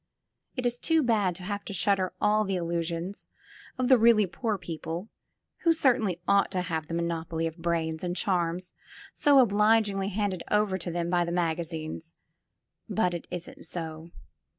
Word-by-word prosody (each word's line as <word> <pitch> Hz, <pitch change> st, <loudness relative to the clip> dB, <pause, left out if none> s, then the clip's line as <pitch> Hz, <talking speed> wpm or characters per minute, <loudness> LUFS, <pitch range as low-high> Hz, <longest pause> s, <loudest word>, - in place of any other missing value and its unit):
It 255 Hz, -2 st, -3 dB
is 245 Hz, 0 st, 0 dB
too 325 Hz, -2 st, +3 dB
bad 210 Hz, -7 st, +2 dB
to 180 Hz, -, -8 dB
have 205 Hz, +2 st, -4 dB
to -, -, -5 dB
shatter 190 Hz, 0 st, +1 dB
all 215 Hz, +1 st, +3 dB
the 195 Hz, -2 st, -1 dB
illusions 170 Hz, +2 st, -3 dB, 0.5 s
of 255 Hz, -1 st, 0 dB
the 260 Hz, -2 st, +6 dB
really 225 Hz, -2 st, +6 dB
poor 215 Hz, +3 st, -2 dB
people, 170 Hz, +2 st, -6 dB, 0.5 s
who 335 Hz, -1 st, +4 dB
certainly 240 Hz, -, +2 dB
ought 200 Hz, 0 st, +4 dB
to 185 Hz, -, 0 dB
have 160 Hz, -3 st, -3 dB
the 165 Hz, -, -4 dB
monopoly 165 Hz, -1 st, -2 dB
of 165 Hz, +1 st, -5 dB
brains 165 Hz, -1 st, -1 dB
and 175 Hz, 0 st, -2 dB
charms 180 Hz, -2 st, 0 dB, 0.4 s
so 290 Hz, -1 st, +4 dB
obligingly 210 Hz, -4 st, +3 dB
handed 200 Hz, -3 st, -1 dB
over 210 Hz, -2 st, +2 dB
to 175 Hz, -, -4 dB
them 170 Hz, 0 st, -2 dB
by 175 Hz, -1 st, +3 dB
the 170 Hz, -, -3 dB
magazines, 165 Hz, -1 st, -3 dB, 0.7 s
but 180 Hz, -5 st, +1 dB
it 170 Hz, -, -5 dB
isn't 180 Hz, -1 st, -7 dB
so. 160 Hz, -1 st, -5 dB
180 Hz, 165 wpm, -28 LUFS, 170-210 Hz, 0.7 s, the